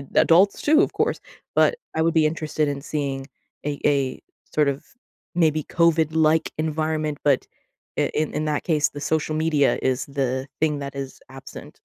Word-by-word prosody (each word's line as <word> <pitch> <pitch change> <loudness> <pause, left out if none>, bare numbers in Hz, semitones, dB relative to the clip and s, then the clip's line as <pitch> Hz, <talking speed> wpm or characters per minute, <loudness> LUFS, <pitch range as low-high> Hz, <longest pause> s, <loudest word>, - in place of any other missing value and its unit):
adults 185 +5 +5
too, 310 +3 +5
of - - 0
course, - - 0 0.4
but - - +4 0.2
I 160 - +1
would 165 0 +2
be 160 -1 +5
interested 155 -1 -1
in 140 -1 -3
seeing 140 -3 -3 0.4
a 145 -1 -2
a 140 -3 +1 0.4
sort 150 -2 +4
of 140 +1 -4 0.5
maybe 155 -3 +2
COVID-like 160 -1 +2
environment 155 -1 -1
but 140 -3 +2 0.5
i - - +2
in 155 -1 0
in 155 +1 -1
that 150 -1 -1
case, 155 -3 +2
the 145 - -8
social 155 +1 0
media 155 -3 +2
is 130 -1 0
the 135 -1 -2
thing 150 -2 +1
that 140 0 -6
is 135 -1 -6
absent. 135 0 -11
150 Hz, 165 wpm, -23 LUFS, 140-160 Hz, 0.5 s, adults